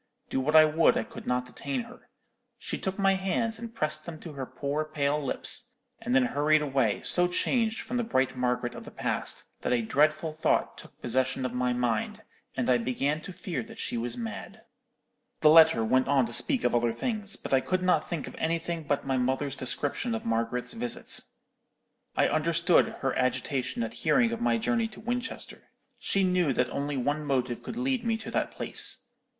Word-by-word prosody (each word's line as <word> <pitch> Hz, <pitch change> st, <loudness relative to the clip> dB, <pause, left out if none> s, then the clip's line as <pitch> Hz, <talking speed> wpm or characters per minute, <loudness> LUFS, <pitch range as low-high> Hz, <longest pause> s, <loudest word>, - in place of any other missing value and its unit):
Do -, -, +1 dB
what 150 Hz, +4 st, 0 dB
I 155 Hz, 0 st, +9 dB
would, 155 Hz, +2 st, +3 dB
I -, -, 0 dB
could -, -, -11 dB
not 125 Hz, 0 st, 0 dB
detain 130 Hz, +1 st, -4 dB
her. -, -, -14 dB, 0.5 s
She -, -, -4 dB
took 190 Hz, 0 st, -3 dB
my 195 Hz, -1 st, +3 dB
hands, 195 Hz, +4 st, -1 dB
and 230 Hz, -1 st, -7 dB
pressed 155 Hz, -7 st, -2 dB
them 160 Hz, -2 st, -7 dB
to 165 Hz, -, -8 dB
her 135 Hz, -2 st, -5 dB
poor 145 Hz, +2 st, -2 dB
pale 150 Hz, -1 st, -1 dB
lips, 245 Hz, -, -1 dB, 0.3 s
and 240 Hz, +2 st, -1 dB
then 255 Hz, 0 st, +5 dB
hurried 155 Hz, -6 st, +2 dB
away, 135 Hz, -7 st, 0 dB
so 180 Hz, 0 st, +3 dB
changed 225 Hz, +5 st, 0 dB
from 245 Hz, +2 st, -4 dB
the 240 Hz, -, +1 dB
bright 130 Hz, -, 0 dB
Margaret 125 Hz, -1 st, -1 dB
of -, -, -9 dB
the -, -, -10 dB
past, -, -, -2 dB, 0.2 s
that -, -, -1 dB
a 120 Hz, -2 st, +2 dB
dreadful 155 Hz, +6 st, +2 dB
thought 155 Hz, -, +1 dB
took -, -, -13 dB
possession 130 Hz, +2 st, +1 dB
of 125 Hz, -, -3 dB
my 125 Hz, 0 st, 0 dB
mind, 120 Hz, -3 st, -1 dB, 0.3 s
and -, -, 0 dB
I 125 Hz, -1 st, +4 dB
began 135 Hz, +6 st, -1 dB
to 190 Hz, -, -8 dB
fear 180 Hz, -1 st, -4 dB
that 225 Hz, 0 st, -11 dB
she -, -, -3 dB
was 120 Hz, +1 st, -3 dB
mad.'_ 110 Hz, -3 st, -6 dB, 0.8 s
"The 150 Hz, -, +7 dB
letter 160 Hz, -8 st, +7 dB
went 130 Hz, +3 st, +2 dB
on 135 Hz, -2 st, +3 dB
to 120 Hz, -, -6 dB
speak 270 Hz, -, +4 dB
of -, -, +2 dB
other 120 Hz, -1 st, +2 dB
things; 210 Hz, -, -3 dB
but -, -, -6 dB
I 135 Hz, -, +6 dB
could 185 Hz, +4 st, -1 dB
not 170 Hz, -4 st, +2 dB
think 165 Hz, -5 st, -3 dB
of -, -, -8 dB
anything 165 Hz, +1 st, -1 dB
but 145 Hz, -1 st, -1 dB
my 135 Hz, -1 st, 0 dB
mother's 130 Hz, +2 st, -1 dB
description 145 Hz, -, -1 dB
of 225 Hz, -, -5 dB
Margaret's 115 Hz, -, -1 dB
visit. 235 Hz, +1 st, -2 dB, 1.0 s
I -, -, +4 dB
understood 170 Hz, +3 st, +3 dB
her 135 Hz, -, 0 dB
agitation 130 Hz, -1 st, -1 dB
at 115 Hz, 0 st, -4 dB
hearing 235 Hz, -, +2 dB
of 235 Hz, 0 st, -4 dB
my 240 Hz, -, +2 dB
journey 230 Hz, 0 st, 0 dB
to 220 Hz, -, -13 dB
Winchester. 245 Hz, +2 st, -5 dB, 0.3 s
She 195 Hz, -, +1 dB
knew 180 Hz, -6 st, +2 dB
that 125 Hz, 0 st, 0 dB
only 140 Hz, 0 st, -2 dB
one 145 Hz, +4 st, -1 dB
motive 130 Hz, -4 st, -1 dB
could 230 Hz, -, -7 dB
lead 255 Hz, -1 st, 0 dB
me 225 Hz, -1 st, 0 dB
to 220 Hz, -, -8 dB
that -, -, 0 dB
place. -, -, +1 dB
150 Hz, 200 wpm, -28 LUFS, 130-195 Hz, 1.0 s, I